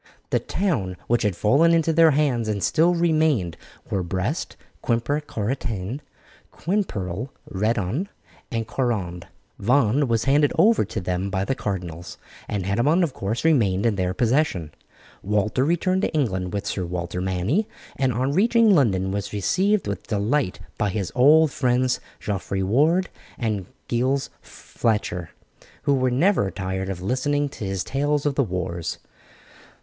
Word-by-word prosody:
The -, -, +3 dB
towns 110 Hz, -, -1 dB
which 120 Hz, 0 st, +1 dB
had 105 Hz, -5 st, 0 dB
fallen 145 Hz, -, +4 dB
into 165 Hz, 0 st, +2 dB
their 165 Hz, 0 st, +6 dB
hands 135 Hz, -6 st, +1 dB
and 105 Hz, -2 st, -2 dB
still 170 Hz, +3 st, +3 dB
remained 155 Hz, -, +2 dB, 0.4 s
were 95 Hz, -, 0 dB
Brest, 95 Hz, -, -3 dB, 0.2 s
Quimper 120 Hz, +5 st, 0 dB
Corentin, 115 Hz, -2 st, -3 dB, 0.5 s
Quimperle, 125 Hz, -, -2 dB, 0.2 s
Redon, 110 Hz, -, -1 dB, 0.4 s
and 115 Hz, -2 st, -2 dB
Guerande; 100 Hz, -9 st, -2 dB, 0.3 s
Vannes 125 Hz, +4 st, +3 dB
was 115 Hz, -2 st, +1 dB
handed 145 Hz, +1 st, +3 dB
over 220 Hz, -, +5 dB
to 110 Hz, +2 st, -4 dB
them 90 Hz, +1 st, -2 dB
by 95 Hz, 0 st, -1 dB
the 135 Hz, -, 0 dB
cardinals, 90 Hz, -7 st, -5 dB, 0.3 s
and 100 Hz, -3 st, -3 dB
Hennebon, 130 Hz, -, +2 dB
of 155 Hz, -6 st, -1 dB
course, 110 Hz, +9 st, -3 dB
remained 105 Hz, -11 st, +3 dB
in 115 Hz, -, +3 dB
their 90 Hz, -1 st, -1 dB
possession. 115 Hz, -, +1 dB, 0.5 s
Walter 105 Hz, +5 st, +1 dB
returned 175 Hz, +5 st, +1 dB
to -, -, -1 dB
England 95 Hz, -11 st, 0 dB
with 100 Hz, -1 st, -3 dB
Sir 95 Hz, -, -2 dB
Walter 90 Hz, 0 st, -4 dB
Manny, 95 Hz, -, 0 dB, 0.3 s
and 130 Hz, -1 st, +1 dB
on 130 Hz, +4 st, 0 dB
reaching 225 Hz, +5 st, +4 dB
London 95 Hz, -, +2 dB
was 100 Hz, 0 st, -3 dB
received 190 Hz, -, +1 dB
with 100 Hz, -, -4 dB
delight 110 Hz, +2 st, 0 dB, 0.2 s
by 105 Hz, -, +1 dB
his 100 Hz, -1 st, -3 dB
old 150 Hz, +4 st, +5 dB
friends 125 Hz, -1 st, +1 dB, 0.2 s
Geoffrey 95 Hz, -1 st, -2 dB
Ward 155 Hz, -, +2 dB, 0.3 s
and 105 Hz, -6 st, -2 dB, 0.2 s
Giles 130 Hz, +3 st, 0 dB
Fletcher, 105 Hz, -6 st, -2 dB, 0.5 s
who 140 Hz, -, +3 dB
were 130 Hz, -1 st, +2 dB
never 135 Hz, -, +2 dB
tired 95 Hz, 0 st, -4 dB
of 90 Hz, -2 st, -5 dB
listening 145 Hz, +6 st, 0 dB
to 115 Hz, -, -7 dB
his 95 Hz, -1 st, -2 dB
tales 145 Hz, +2 st, 0 dB
of 145 Hz, -, +2 dB
the 140 Hz, -, +2 dB
wars. 90 Hz, -4 st, -3 dB
115 Hz, 145 wpm, -23 LUFS, 95-145 Hz, 0.5 s, their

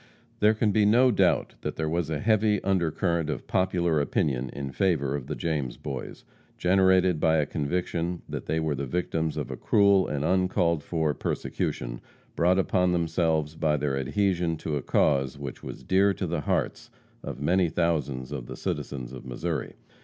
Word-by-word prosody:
There 105 Hz, +1 st, +4 dB
can 110 Hz, -1 st, +1 dB
be 105 Hz, +1 st, +3 dB
no 120 Hz, +5 st, +5 dB
doubt 105 Hz, -, +2 dB
that -, -, -4 dB
there 80 Hz, -, -2 dB
was 85 Hz, 0 st, -1 dB
a 80 Hz, -, -1 dB
heavy 110 Hz, -1 st, +2 dB
undercurrent 85 Hz, -3 st, 0 dB
of 75 Hz, -, -4 dB
popular 85 Hz, -4 st, +1 dB
opinion 65 Hz, -3 st, 0 dB
in 70 Hz, 0 st, -5 dB
favor 75 Hz, -7 st, +1 dB
of 70 Hz, -3 st, -5 dB
the -, -, -3 dB
James 75 Hz, -7 st, -2 dB
Boys, 70 Hz, -3 st, -7 dB, 0.3 s
generated 95 Hz, -2 st, +3 dB
by 80 Hz, 0 st, +3 dB
a 75 Hz, -, +2 dB
conviction 85 Hz, +3 st, -2 dB
that -, -, -6 dB
they 80 Hz, -, 0 dB
were 80 Hz, -2 st, 0 dB
the 70 Hz, 0 st, -4 dB
victims 80 Hz, 0 st, -1 dB
of -, -, -3 dB
cruel 100 Hz, -2 st, +4 dB
and 75 Hz, 0 st, -2 dB
uncalled 90 Hz, -3 st, +2 dB
for 80 Hz, -1 st, -1 dB
persecution, -, -, -3 dB, 0.3 s
brought 90 Hz, +4 st, +3 dB
upon 90 Hz, -1 st, +2 dB
themselves 80 Hz, -2 st, 0 dB
by 75 Hz, -2 st, +1 dB
their 70 Hz, -2 st, -1 dB
adhesion 85 Hz, +4 st, 0 dB
to 75 Hz, -1 st, -3 dB
a 70 Hz, -, -1 dB
cause 70 Hz, 0 st, +1 dB
which 70 Hz, -3 st, -7 dB
was -, -, -8 dB
dear 95 Hz, +1 st, +3 dB
to 95 Hz, -, -3 dB
the 85 Hz, -2 st, -2 dB
hearts -, -, -2 dB, 0.3 s
of -, -, -6 dB
many 85 Hz, +4 st, +2 dB
thousands 75 Hz, -7 st, -1 dB
of 65 Hz, -5 st, -5 dB
the -, -, -7 dB
citizens 65 Hz, -2 st, -4 dB
of 65 Hz, -, -8 dB
Missouri. 65 Hz, -1 st, -4 dB
80 Hz, 175 wpm, -27 LUFS, 70-95 Hz, 0.3 s, no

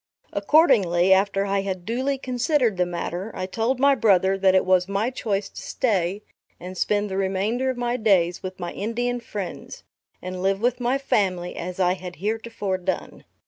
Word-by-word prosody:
Accordingly, 195 Hz, -, +4 dB
after 195 Hz, +1 st, +2 dB
I 200 Hz, 0 st, 0 dB
had 190 Hz, -2 st, -4 dB
duly 260 Hz, +5 st, -1 dB
considered 250 Hz, -, 0 dB
the 180 Hz, 0 st, +1 dB
matter, 175 Hz, +3 st, -4 dB
I 185 Hz, -, -3 dB
told 225 Hz, +7 st, -1 dB
my 280 Hz, +1 st, +5 dB
brother 195 Hz, -6 st, +3 dB
that 190 Hz, -1 st, +3 dB
it 185 Hz, -, +3 dB
was 185 Hz, -1 st, +3 dB
my 200 Hz, +5 st, -1 dB
choice 205 Hz, -5 st, -2 dB
to -, -, -10 dB
stay 200 Hz, -4 st, -1 dB, 0.4 s
and 185 Hz, +1 st, -8 dB
spend 205 Hz, +2 st, 0 dB
the 190 Hz, -1 st, -4 dB
remainder 195 Hz, +7 st, 0 dB
of 260 Hz, -, -2 dB
my 245 Hz, 0 st, -1 dB
days 185 Hz, -6 st, +2 dB
with 185 Hz, 0 st, -7 dB
my 175 Hz, -1 st, -4 dB
Indian 240 Hz, +4 st, -2 dB
friends, 205 Hz, -5 st, -7 dB, 0.4 s
and 185 Hz, 0 st, -6 dB
live 195 Hz, +1 st, +1 dB
with 245 Hz, +2 st, 0 dB
my 245 Hz, +2 st, +1 dB
family 185 Hz, -9 st, 0 dB
as 180 Hz, +2 st, -6 dB
I 180 Hz, -1 st, +3 dB
had 180 Hz, -1 st, -8 dB
heretofore 210 Hz, -1 st, -3 dB
done. 185 Hz, +1 st, -4 dB
195 Hz, 180 wpm, -24 LUFS, 185-235 Hz, 0.4 s, my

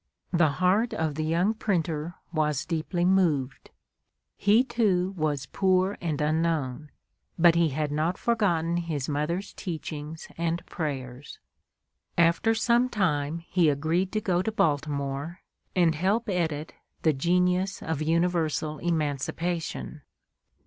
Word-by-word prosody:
The 165 Hz, -4 st, +3 dB
heart 200 Hz, -, +2 dB
of 160 Hz, -6 st, -1 dB
the 155 Hz, +2 st, -3 dB
young 170 Hz, +7 st, +2 dB
printer 170 Hz, -6 st, -2 dB, 0.2 s
was 150 Hz, -2 st, 0 dB
deeply 175 Hz, +2 st, -1 dB
moved. 160 Hz, -9 st, +1 dB, 0.7 s
He, 210 Hz, +5 st, +4 dB
too, 195 Hz, -7 st, +1 dB
was 150 Hz, -5 st, -1 dB
poor 190 Hz, +3 st, +1 dB
and 160 Hz, -4 st, -2 dB
unknown, 150 Hz, -2 st, 0 dB, 0.5 s
but 170 Hz, 0 st, +6 dB
he 170 Hz, -1 st, +3 dB
had 150 Hz, +1 st, -2 dB
not 155 Hz, +5 st, 0 dB
forgotten 175 Hz, -8 st, +1 dB
his 160 Hz, -6 st, -3 dB
mother's 155 Hz, +7 st, -2 dB
teachings 160 Hz, -3 st, -6 dB
and 170 Hz, 0 st, -1 dB
prayers. 135 Hz, -4 st, -5 dB, 0.8 s
After 170 Hz, +7 st, +3 dB
some 240 Hz, +2 st, +3 dB
time 165 Hz, -, 0 dB
he 175 Hz, -4 st, +3 dB
agreed 160 Hz, +6 st, 0 dB
to 215 Hz, -, 0 dB
go 180 Hz, -3 st, +1 dB
to 220 Hz, -, -2 dB
Baltimore, 145 Hz, -2 st, -1 dB, 0.3 s
and 170 Hz, -3 st, +4 dB
help 195 Hz, +9 st, 0 dB
edit 160 Hz, -5 st, -2 dB, 0.3 s
the 155 Hz, -, +4 dB
"Genius 180 Hz, +5 st, +1 dB
of 160 Hz, -2 st, -2 dB
Universal 160 Hz, -2 st, 0 dB
Emancipation." 160 Hz, -, -2 dB
165 Hz, 120 wpm, -27 LUFS, 150-185 Hz, 0.8 s, but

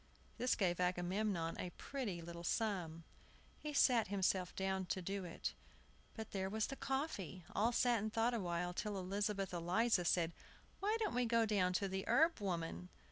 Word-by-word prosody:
This 250 Hz, -, +3 dB
gave 180 Hz, -3 st, +1 dB
Agamemnon 180 Hz, 0 st, 0 dB
a 180 Hz, -, -2 dB
pretty 215 Hz, -12 st, -4 dB
little 170 Hz, 0 st, -7 dB
sum. 175 Hz, -5 st, -1 dB, 0.6 s
He 300 Hz, -, -4 dB
sat 250 Hz, -6 st, +4 dB
himself 190 Hz, -2 st, +1 dB
down 190 Hz, -1 st, -1 dB
to 185 Hz, -, -1 dB
do 195 Hz, +1 st, -3 dB
it. 170 Hz, -, -4 dB, 0.6 s
But 220 Hz, -2 st, -6 dB
there 190 Hz, -1 st, -1 dB
was 215 Hz, +2 st, 0 dB
the 275 Hz, -, -5 dB
coffee! 265 Hz, -, -3 dB
All 225 Hz, +4 st, +3 dB
sat 240 Hz, -1 st, +3 dB
and 215 Hz, +1 st, -2 dB
thought 230 Hz, +2 st, +2 dB
awhile, 175 Hz, -4 st, -1 dB
till 205 Hz, +2 st, -2 dB
Elizabeth 195 Hz, 0 st, -1 dB
Eliza 180 Hz, +4 st, +2 dB
said, 170 Hz, 0 st, +2 dB, 0.5 s
"Why 425 Hz, +3 st, +1 dB
don't 430 Hz, -2 st, 0 dB
we 245 Hz, 0 st, +2 dB
go 230 Hz, 0 st, +4 dB
to 195 Hz, -2 st, +2 dB
the 190 Hz, 0 st, -2 dB
herb 325 Hz, 0 st, +4 dB
woman?" 165 Hz, -, -3 dB
195 Hz, 165 wpm, -39 LUFS, 180-225 Hz, 0.6 s, sat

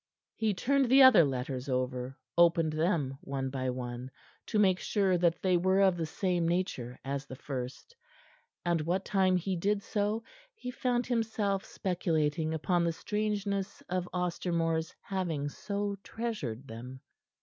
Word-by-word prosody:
He 215 Hz, -3 st, 0 dB
turned 275 Hz, +5 st, +2 dB
the 265 Hz, +1 st, +8 dB
other 260 Hz, -9 st, +9 dB
letters 130 Hz, -1 st, -2 dB
over; 125 Hz, 0 st, -2 dB, 0.2 s
opened 165 Hz, -2 st, +4 dB
them 155 Hz, -5 st, 0 dB
one 135 Hz, -1 st, -3 dB
by 130 Hz, -1 st, -2 dB
one, 125 Hz, 0 st, -4 dB, 0.4 s
to -, -, -1 dB
make 190 Hz, -3 st, +4 dB
sure 195 Hz, -3 st, +2 dB
that 170 Hz, -1 st, +1 dB
they 185 Hz, -2 st, +4 dB
were 190 Hz, +2 st, +3 dB
of 190 Hz, -2 st, +5 dB
the 165 Hz, -2 st, -2 dB
same 175 Hz, 0 st, 0 dB
nature 165 Hz, -9 st, -2 dB
as 140 Hz, +1 st, -3 dB
the 130 Hz, -, -7 dB
first, 130 Hz, -, -6 dB, 0.7 s
and 170 Hz, -2 st, +2 dB
what 180 Hz, +5 st, -1 dB
time 190 Hz, -2 st, +3 dB
he 185 Hz, +2 st, -1 dB
did 200 Hz, +3 st, 0 dB
so 210 Hz, +2 st, -1 dB, 0.3 s
he 250 Hz, -, -6 dB
found 250 Hz, -1 st, 0 dB
himself 220 Hz, -5 st, 0 dB
speculating 160 Hz, -3 st, 0 dB
upon 170 Hz, +2 st, +1 dB
the 170 Hz, -1 st, +1 dB
strangeness 205 Hz, 0 st, -2 dB
of 180 Hz, 0 st, -1 dB
Ostermore's 170 Hz, -2 st, -1 dB
having 170 Hz, -7 st, -2 dB
so 200 Hz, +5 st, -3 dB
treasured 145 Hz, -, -4 dB
them. 125 Hz, +3 st, -8 dB
175 Hz, 150 wpm, -31 LUFS, 140-200 Hz, 0.7 s, other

